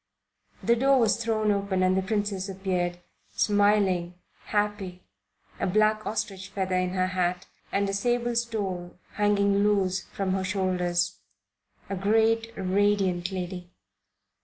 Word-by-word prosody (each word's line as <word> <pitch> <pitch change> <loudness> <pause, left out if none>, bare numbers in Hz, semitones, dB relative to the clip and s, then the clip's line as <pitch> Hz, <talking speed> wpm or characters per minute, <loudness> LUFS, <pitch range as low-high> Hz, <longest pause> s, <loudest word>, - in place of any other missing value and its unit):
The 235 - +4
door 270 +2 +4
was 230 0 +2
thrown 215 -2 +1
open 200 -2 0
and 185 0 +3
the 190 - +2
Princess 205 -1 -2
appeared, 180 -2 -2 0.3
smiling, 205 -4 +2 0.3
happy, 205 -3 -2 0.6
a - - 0
black 215 +2 +2
ostrich 205 -3 -3
feather 190 -1 -2
in 185 0 0
her 185 0 +2
hat 180 -1 -1 0.3
and 200 0 +1
a 195 - -2
sable 240 +3 0
stole 200 -7 -3
hanging 200 -1 +2
loose 195 -3 +1
from 195 -2 -2
her 190 0 -1
shoulders; 180 -2 0 0.7
a 200 - -3
great 225 +3 +2
and 185 -1 -2
radiant 195 -3 +2
lady. 180 -1 -5
195 Hz, 135 wpm, -27 LUFS, 185-210 Hz, 0.7 s, The